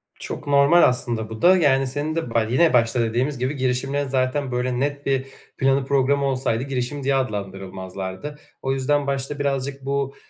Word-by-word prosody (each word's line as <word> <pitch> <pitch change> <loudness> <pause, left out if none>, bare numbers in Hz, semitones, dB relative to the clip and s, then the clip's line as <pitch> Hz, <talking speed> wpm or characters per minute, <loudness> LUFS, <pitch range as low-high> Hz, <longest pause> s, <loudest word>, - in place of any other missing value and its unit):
Çok - - -7
normal, 145 +4 +5
aslında, 115 -3 +1
bu 110 0 -8
da. 185 +2 +6
Yani, 135 -5 +3
senin 145 +4 -3
de 165 -9 -3
baş 115 -1 +1
yine 155 +4 +4
başta 120 0 +3
dediğimiz 120 +5 0
gibi 130 +4 -1
girişimlerin, 135 +2 -1
zaten, 130 +1 0
böyle 125 0 -1
net 140 0 -2
bir 135 -1 0 0.3
planı 135 0 +2
programı 140 +1 +2
olsaydı 130 -3 0
girişim 135 +1 -3
diye 135 +1 +2
adlandırılmazlardı. 95 +1 -4 0.3
O 135 0 0
yüzden 140 +2 0
başta 140 +1 -2
birazcık 135 -1 -2
bu, 140 0 -1
135 Hz, 170 wpm, -22 LUFS, 125-140 Hz, 0.3 s, da